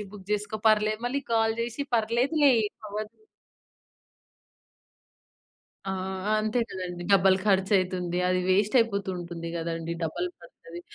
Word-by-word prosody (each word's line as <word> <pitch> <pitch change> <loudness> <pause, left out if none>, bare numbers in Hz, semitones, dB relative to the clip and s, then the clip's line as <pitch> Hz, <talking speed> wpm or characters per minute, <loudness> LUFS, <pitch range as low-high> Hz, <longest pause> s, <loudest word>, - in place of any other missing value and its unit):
Reebok 200 -1 -10
చేసుకో 210 +1 -2
పర్లే. 215 0 +3
మళ్ళీ 280 +3 -2
కాల్ 225 -1 +2
చేసి, 240 +4 -3
"పర్లేదులే 255 +7 +3
ఏం 205 - -3 0.2
అవ్వదు". 215 - -6 2.7
ఆ! - - 0 0.5
అంతే 215 +3 0
కదండీ! 180 -2 -5
డబుల్ 190 0 +5
ఖర్చయితుంది. 185 -3 +1
అది 185 0 +2
వేస్ట్ 200 +5 +2
అయిపోతూ 200 -4 +1
ఉంటుంది 170 -1 -6
గదండీ! 165 0 -3
డబుల్ 170 +3 -2
ఖర్చది. 170 0 -12
200 Hz, 115 wpm, -27 LUFS, 180-215 Hz, 2.7 s, డబుల్